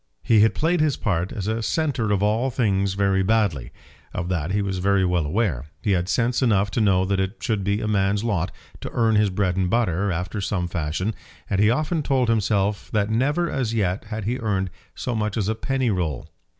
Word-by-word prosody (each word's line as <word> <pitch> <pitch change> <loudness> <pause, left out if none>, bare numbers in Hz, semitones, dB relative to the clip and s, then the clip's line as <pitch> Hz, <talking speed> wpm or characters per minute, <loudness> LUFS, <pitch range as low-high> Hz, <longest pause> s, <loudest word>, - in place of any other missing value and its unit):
He 110 - +4
had 110 +1 +4
played 165 +2 +1
his 150 -3 +2
part 90 -4 -1
as 100 - -4
a 110 +2 -1
centre 130 -4 0
of 100 -1 +1
all 110 +5 +1
things 100 -6 0
very 100 -1 +2
badly. 95 - +1 0.4
Of 90 -1 -3
that 85 -2 -1
he 100 +1 +1
was 95 -2 -2
very 100 0 +2
well 90 -4 +1
aware. 80 - -1
He 105 - -1
had 90 -1 +1
sense 120 +3 +1
enough 105 -5 +2
to 115 - 0
know 95 -3 +3
that 100 0 0
it 95 +2 -1
should 105 -4 -1
be 100 +2 0
a - - -2
man's 100 0 +1
lot 100 -6 0 0.3
to - - -6
earn 115 -2 +2
his 105 -1 +3
bread 95 -1 0
after 95 -3 0
some 95 -2 -1
fashion, 85 +5 -2 0.4
and 100 0 +2
he 105 - +5
often 155 +6 0
told 130 -4 +1
himself 105 -2 0
that 105 0 +1
never 145 +9 +1
as 125 -7 -2
yet 95 0 0
had 110 -1 -5
he 125 +4 -1
earned 95 -5 -1 0.2
so 125 - -3
much 105 -1 -1
as 100 -3 0
a 110 - +1
penny 130 +1 -1
roll. 85 -8 -2
105 Hz, 210 wpm, -23 LUFS, 95-115 Hz, 0.4 s, he